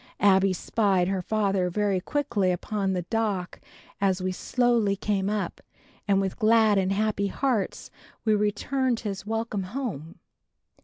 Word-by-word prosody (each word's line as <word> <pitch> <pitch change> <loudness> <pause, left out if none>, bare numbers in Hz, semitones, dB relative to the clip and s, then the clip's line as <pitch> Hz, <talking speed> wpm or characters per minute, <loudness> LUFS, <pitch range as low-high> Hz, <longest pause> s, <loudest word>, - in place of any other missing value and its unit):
Abbie 195 -1 +4
spied 190 -1 +1
her 195 -1 -1
father 195 -2 0
very 200 0 0
quickly 235 -8 0
upon 195 +2 -2
the 180 -1 -2
dock 200 -3 -2 0.4
as 190 -2 +2
we 185 0 -1
slowly 235 0 +1
came 200 -1 -1
up 210 -1 -3 0.5
and 195 -1 +3
with 195 +2 -2
glad 220 -2 +4
and 190 0 0
happy 205 0 0
hearts 230 -1 -2 0.3
we 215 - +4
returned 225 +4 0
his 200 -2 -5
"Welcome 225 -2 -2 0.2
home." 170 - -5
200 Hz, 140 wpm, -26 LUFS, 190-220 Hz, 0.5 s, Abbie